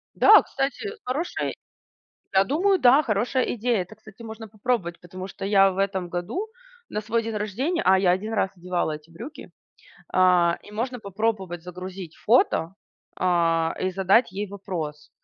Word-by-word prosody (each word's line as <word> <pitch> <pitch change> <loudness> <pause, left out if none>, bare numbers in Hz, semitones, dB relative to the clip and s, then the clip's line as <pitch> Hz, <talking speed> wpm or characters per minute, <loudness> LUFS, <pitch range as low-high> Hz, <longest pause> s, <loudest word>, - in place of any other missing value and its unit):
Да, - - +8
кстати, 275 - -3 0.2
хорошая 290 +8 -2 0.8
Я 190 +1 +5
думаю, 370 - +2
да, 260 +1 +6
хорошая 240 +2 0
идея. 235 0 0
Это, 190 +5 -12
кстати, 215 +1 -15
можно 220 0 -8
попробовать. 210 -5 -2
Потому 185 +1 -8
что 195 - -8
я 195 -1 +5
в 185 - -7
этом 190 -2 -1
году 260 - -3 0.4
на 210 - -2
свой 230 +2 -1
день 225 -1 -4
рождения 255 - -1
А 190 0 +6
я 185 -2 +3
1 215 +4 -5
раз 190 - +1
одевала 175 -2 -2
эти 150 +2 -12
брюки. 235 - -10 0.6
А, 180 -2 +4
и 205 - -14
можно 245 +3 -3
попробовать 195 -4 -2
загрузить 180 -1 -8
фото, 195 -7 +3 0.4
а, 165 -2 +2
и 185 - 0
задать 195 +3 +3
ей 205 +2 -3
вопрос, 165 -7 -6
195 Hz, 160 wpm, -25 LUFS, 180-230 Hz, 0.8 s, Да